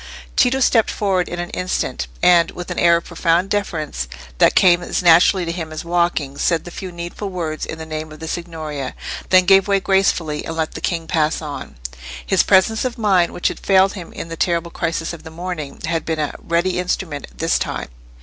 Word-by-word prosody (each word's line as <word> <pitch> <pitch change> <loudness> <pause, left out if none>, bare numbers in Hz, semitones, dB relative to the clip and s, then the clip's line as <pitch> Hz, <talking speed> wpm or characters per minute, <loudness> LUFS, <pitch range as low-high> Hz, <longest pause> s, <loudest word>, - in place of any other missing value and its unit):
Tito 265 +1 +3
stepped 230 -3 +4
forward 190 -3 0
in 175 - -5
an 175 0 -4
instant, 180 - -2 0.2
and, 175 -2 +6
with 180 - -8
the - - -3
air 170 0 +5
of 170 - -5
profound 170 +2 +1
deference 155 - -2 0.3
that - - +5
came 180 -2 +5
as 175 - -2
naturally 175 +2 +5
to 165 - -2
him 165 -2 -5
as 155 +1 -6
walking, 170 -5 0
said 170 -2 +1
the 175 - -9
few 185 +1 -7
needful 175 +4 -6
words 165 -4 -4
in 160 - -5
the 160 - -7
name 155 0 -5
of 155 - -11
the 160 - -6
Signoria; 155 -5 -5 0.3
then 185 -1 +6
gave 195 +1 +5
way 200 -1 +3
gracefully, 185 -6 +1
and 160 - -5
let 160 -1 -1
the 160 - -7
king 165 -1 -2
pass 155 -1 +1
on. 150 -3 -7 0.5
His - - +3
presence 200 +4 +3
of 255 -1 -3
mind, 190 -6 +3
which 175 - 0
had - - -7
failed 190 0 +4
him 180 -4 -8
in - - -7
the 165 - -6
terrible 170 0 0
crisis 165 -1 -2
of 170 - -9
the 160 - -10
morning, 160 -4 -6
had 165 -1 -1
been 160 -1 -2
a 150 -1 -2
ready 175 +2 0
instrument 175 -4 -3
this 165 +1 +1
time. - - -4
170 Hz, 210 wpm, -20 LUFS, 160-185 Hz, 0.5 s, and